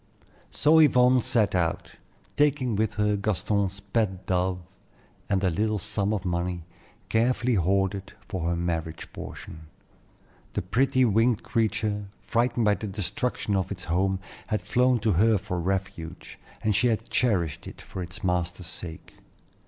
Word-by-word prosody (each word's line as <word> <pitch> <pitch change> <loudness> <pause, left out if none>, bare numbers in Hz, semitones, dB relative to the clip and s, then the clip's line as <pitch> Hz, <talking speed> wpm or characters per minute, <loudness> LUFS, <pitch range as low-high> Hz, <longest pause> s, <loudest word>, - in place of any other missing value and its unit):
So 155 +2 +4
Yvonne 125 -4 +5
set 115 -5 +2
out, 85 -3 -1 0.4
taking 140 -5 +2
with 110 +1 0
her 105 -1 +2
Gaston's 100 -1 0
pet 100 -2 -1
dove 90 0 +1 0.7
and 100 -2 +2
the 95 -2 +2
little 105 +5 0
sum 105 0 -1
of 105 -3 -2
money 90 -1 -1 0.4
carefully 120 +4 +2
hoarded 95 +1 0
for 85 -3 -2
her 85 - +1
marriage 80 -2 -3
portion. 80 -1 -9 0.9
The - - -2
pretty 130 +6 +2
winged 115 +1 +2
creature, 110 -2 0 0.2
frightened 120 0 +1
by 105 - +5
the 105 - -4
destruction 105 - -2
of 95 0 -1
its 95 -2 -5
home, 95 +3 +1 0.3
had 105 -1 -1
flown 125 0 +3
to 110 - +2
her 105 +5 +4
for 95 -2 -4
refuge, 90 -2 -4 0.2
and 110 -2 +2
she 120 +6 +3
had 115 0 -1
cherished 90 - 0
it - - -10
for 95 - -7
its 90 0 -8
master's 90 0 -1
sake. 85 -1 -8
100 Hz, 145 wpm, -26 LUFS, 90-115 Hz, 0.9 s, Yvonne